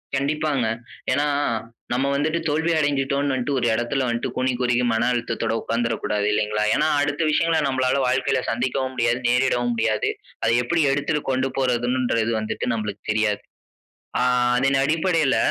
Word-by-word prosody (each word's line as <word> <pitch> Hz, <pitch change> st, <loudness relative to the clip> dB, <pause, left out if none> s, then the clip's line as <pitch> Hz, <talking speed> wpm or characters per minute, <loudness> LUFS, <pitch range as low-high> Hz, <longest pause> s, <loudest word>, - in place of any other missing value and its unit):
கண்டிப்பாங்க. 140 Hz, -2 st, 0 dB, 0.5 s
ஏனா, 145 Hz, -, +2 dB, 0.7 s
நம்ம 130 Hz, +3 st, +1 dB
வந்துட்டு 155 Hz, +4 st, 0 dB
தோல்வி 160 Hz, +3 st, +1 dB
அடைஞ்சுட்டோம்னு 140 Hz, -2 st, 0 dB
1 120 Hz, -, 0 dB
எடத்தில 120 Hz, +3 st, 0 dB
வந்து 115 Hz, -, -2 dB
கூனி 130 Hz, 0 st, +1 dB
குறுகி 125 Hz, 0 st, +2 dB
மன 115 Hz, +2 st, +1 dB
அழுத்தத்தோடு 115 Hz, -1 st, -1 dB
உட்கார்ந்துடக்கூடாது 115 Hz, -3 st, -1 dB
இல்லைங்களா. 105 Hz, 0 st, 0 dB
ஏனா 155 Hz, -, +2 dB
அடுத்த 145 Hz, +2 st, -1 dB
விஷயங்களை 165 Hz, +1 st, +2 dB
நம்மளால 130 Hz, 0 st, +1 dB
வாழ்க்கையில 130 Hz, 0 st, +1 dB
சந்திக்கவும் 130 Hz, +2 st, -1 dB
முடியாது 120 Hz, 0 st, +1 dB
நேரிடவும் 120 Hz, -1 st, +2 dB
முடியாது. 110 Hz, -1 st, 0 dB, 0.3 s
அத -, -, +3 dB
எப்புடி 165 Hz, +4 st, +1 dB
எடுத்துட்டு 145 Hz, +1 st, -1 dB
கொண்டு 130 Hz, +1 st, 0 dB
போறதுகிறது 120 Hz, -2 st, +1 dB
வந்துட்டு 110 Hz, -, -3 dB
நம்ளுக்கு 105 Hz, -2 st, -4 dB
தெரியாது. 105 Hz, -1 st, 0 dB, 0.8 s
ஆ -, -, +1 dB, 0.4 s
அதன் 135 Hz, +2 st, +2 dB
அடிப்படையில 160 Hz, -3 st, +2 dB
130 Hz, 135 wpm, -23 LUFS, 115-145 Hz, 0.8 s, அத